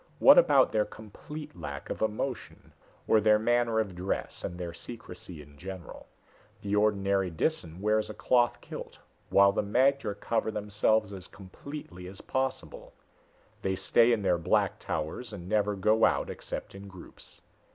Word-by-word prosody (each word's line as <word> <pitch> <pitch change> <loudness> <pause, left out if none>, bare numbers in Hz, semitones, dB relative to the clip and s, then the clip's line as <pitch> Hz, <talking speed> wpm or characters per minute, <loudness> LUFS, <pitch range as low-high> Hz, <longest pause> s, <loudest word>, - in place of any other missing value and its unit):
What - - +8
about - - +4
their 110 -1 +2
complete 150 +9 -10
lack 70 -4 -7
of - - -5
emotion? 110 +4 -3 0.3
Or 110 - +4
their 105 0 +5
manner 115 0 +2
of 105 -4 -1
dress 90 +2 -4
and 85 - -5
their 85 -2 -5
secrecy 90 -6 -9
in 70 0 -18
general? 95 +1 -9 0.6
The 100 0 -1
ordinary 100 -2 +2
Disan 85 - -2
wears 105 +1 +1
a 110 - -7
cloth 120 -1 +2
kilt, - - -8 0.3
while 100 0 +6
the 100 - 0
magter 120 0 +1
cover 115 0 -1
themselves 105 0 0
as 95 -2 -8
completely 95 -1 -10
as 95 +1 -10
possible. 130 0 -4 0.7
They 95 0 0
stay 115 +5 +4
in 110 -3 +1
their 90 -3 +2
black 85 - +1
towers 80 +10 -4
and 90 -3 -8
never 105 0 +1
go 110 +3 +2
out - - +2
except - - -7
in 100 +1 -10
groups. 95 -2 -13
105 Hz, 155 wpm, -29 LUFS, 95-110 Hz, 0.7 s, What